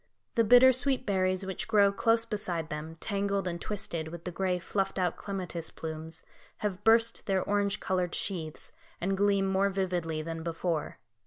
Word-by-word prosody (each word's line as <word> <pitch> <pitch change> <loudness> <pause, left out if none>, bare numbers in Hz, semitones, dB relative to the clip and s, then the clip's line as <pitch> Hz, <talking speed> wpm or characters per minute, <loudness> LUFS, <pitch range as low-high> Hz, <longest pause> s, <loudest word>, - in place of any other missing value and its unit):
The 230 - +3
bitter 245 +4 +8
sweet 255 +1 0
berries 185 -1 +1
which 190 -1 -4
grow 205 -2 +5
close 225 +2 +2
beside 185 -8 -3
them, 155 +2 -5
tangled 200 +1 -1
and 170 -1 -4
twisted 175 -6 -3
with 170 +1 -8
the 180 - -4
gray, 185 0 0
fluffed 195 +2 -2
out 180 -2 +1
clematis 180 -4 -4
plumes, 160 0 -7 0.4
have 190 -3 -2
burst 230 +1 +3
their 190 -2 +1
orange 205 0 0
coloured 180 -2 -1
sheaths, 165 -6 -2 0.3
and 195 +2 0
gleam 200 0 +2
more 195 +1 +2
vividly 175 -5 -2
than 165 0 -5
before. 165 -1 -2
190 Hz, 165 wpm, -30 LUFS, 170-205 Hz, 0.4 s, bitter